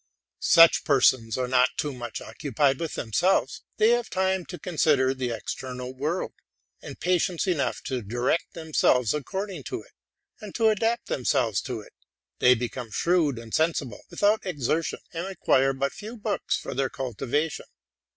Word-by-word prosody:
Such 165 0 +7
persons 130 -5 +3
are 130 -1 -1
not 125 0 +2
too 145 -2 -2
much 120 -2 -6
occupied 140 -1 0
with 165 -2 -4
themselves: 170 - +1 0.2
they 215 - +5
have 240 -1 +1
time 190 -1 0
to 180 - -7
consider 150 -6 +2
the 130 -2 -3
external 125 +2 -5
world, 150 +7 -2 0.5
and - - -9
patience 180 -1 +1
enough 175 -7 -1
to 130 -2 -3
direct 120 +9 -1
themselves 150 -7 +2
according 190 +3 -4
to - - -5
it, - - -22 0.5
and 210 -3 -10
to 225 -2 +4
adapt 225 +3 0
themselves 120 -5 0
to 120 -3 -3
it; - - -17 0.5
they 125 0 +6
become 120 0 -5
shrewd 155 +2 +1
and 115 -1 -10
sensible 155 -8 0
without 210 +2 +2
exertion, 160 -2 -1
and 170 +2 -3
require 135 -8 +2
but 135 +1 -2
few 220 +3 -8
books 210 -1 -1
for - - -6
their 135 0 0
cultivation. 135 +5 -3
145 Hz, 155 wpm, -26 LUFS, 125-180 Hz, 0.5 s, Such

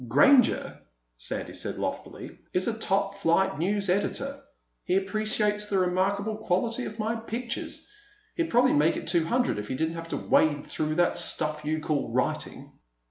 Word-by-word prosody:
"Granger," 235 - +4 0.4
Sandy - - -4
said - - -4
loftily, - - -5
"is 180 - +1
a 230 - 0
top 195 -2 0
flight 190 +1 +2
news 200 +4 0
editor. 275 +9 -1 0.4
He 180 - 0
appreciates 210 +1 0
the 200 - 0
remarkable 195 +4 +1
quality 225 +4 -1
of 215 - -7
my 225 +1 -1
pictures. 235 +2 -5 0.5
He'd 335 -1 -1
probably 250 +2 +4
make 150 +3 +3
it - - -6
two 170 -3 +2
hundred 245 - +1
if 105 - -5
he 130 - -3
didn't 160 +4 -1
have 165 0 -7
to - - -2
wade 145 -2 +2
through 155 0 -2
that 175 +1 +2
stuff 155 -1 -1
you 155 +1 -1
call 150 -2 -1
writing." - - -2
195 Hz, 165 wpm, -27 LUFS, 160-220 Hz, 0.5 s, Granger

